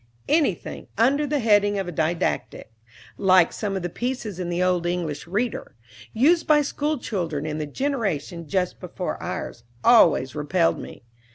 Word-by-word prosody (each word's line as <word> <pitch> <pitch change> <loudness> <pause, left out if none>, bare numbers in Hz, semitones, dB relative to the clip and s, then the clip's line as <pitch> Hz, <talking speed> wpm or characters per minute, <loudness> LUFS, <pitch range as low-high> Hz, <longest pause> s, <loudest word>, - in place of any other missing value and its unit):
Anything 305 0 0
under 280 +6 +3
the 295 +1 0
heading 205 -4 +3
of 195 - -1
"Didactick," 160 -7 -2 0.5
like 185 -3 +5
some 205 -2 -3
of 185 - -5
the - - 0
pieces 235 -3 -4
in 175 -1 -3
the 175 +1 0
old 180 -1 +1
"English 170 -4 -3
Reader," 210 - -3 0.4
used 320 +9 +3
by 295 -1 +5
school 295 +2 -1
children 165 - -3
in 155 0 -3
the 150 - -3
generation 185 - -2
just 180 +3 -1
before - - -5
ours, 115 - -5 0.2
always 165 - +5
repelled 165 +3 +1
me. - - -10
185 Hz, 155 wpm, -24 LUFS, 165-245 Hz, 0.5 s, like